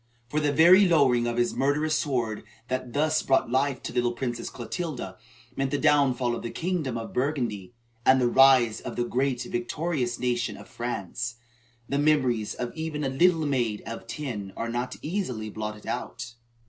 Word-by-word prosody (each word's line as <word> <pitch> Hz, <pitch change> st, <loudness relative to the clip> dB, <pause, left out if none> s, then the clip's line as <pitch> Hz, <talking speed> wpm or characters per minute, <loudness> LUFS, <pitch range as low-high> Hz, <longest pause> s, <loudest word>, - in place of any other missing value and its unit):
For 150 Hz, -, 0 dB
the 150 Hz, -1 st, +1 dB
very 175 Hz, +7 st, +7 dB
lowering 130 Hz, -8 st, +4 dB
of 120 Hz, 0 st, -2 dB
the 120 Hz, 0 st, +1 dB
murderous 150 Hz, +3 st, +1 dB
sword 120 Hz, -8 st, -1 dB, 0.3 s
that 130 Hz, -1 st, -3 dB
thus 155 Hz, +2 st, +2 dB
brought 135 Hz, -3 st, +1 dB
life 135 Hz, 0 st, +1 dB
to -, -, -4 dB
the -, -, -6 dB
little 120 Hz, 0 st, +1 dB
Princess 120 Hz, -1 st, -4 dB
Clotilda 135 Hz, -, -5 dB, 0.4 s
meant 135 Hz, 0 st, 0 dB
the 145 Hz, -, 0 dB
downfall 135 Hz, -5 st, +3 dB
of -, -, -6 dB
the 115 Hz, -, -4 dB
kingdom 160 Hz, -6 st, -2 dB
of 115 Hz, -, -6 dB
Burgundy 120 Hz, -7 st, -2 dB, 0.3 s
and 130 Hz, +1 st, +5 dB
the 125 Hz, -, +3 dB
rise 130 Hz, -3 st, +5 dB
of -, -, -6 dB
the 120 Hz, -, 0 dB
great 130 Hz, 0 st, -1 dB
and -, -, -10 dB
victorious 125 Hz, 0 st, -2 dB
nation 120 Hz, -1 st, -1 dB
of -, -, -12 dB
France. 115 Hz, 0 st, -4 dB, 0.5 s
The 140 Hz, -, 0 dB
memories 130 Hz, -8 st, +2 dB
of 125 Hz, -1 st, -4 dB
even 160 Hz, -2 st, -4 dB
a 135 Hz, -, 0 dB
little 165 Hz, +3 st, +3 dB
maid 120 Hz, -7 st, 0 dB
of 115 Hz, 0 st, -7 dB
ten 110 Hz, -10 st, -5 dB
are 115 Hz, -, -3 dB
not 120 Hz, +2 st, -3 dB
easily 130 Hz, -, -3 dB
blotted 105 Hz, 0 st, -6 dB
out. 115 Hz, -, -5 dB
130 Hz, 180 wpm, -27 LUFS, 120-150 Hz, 0.5 s, very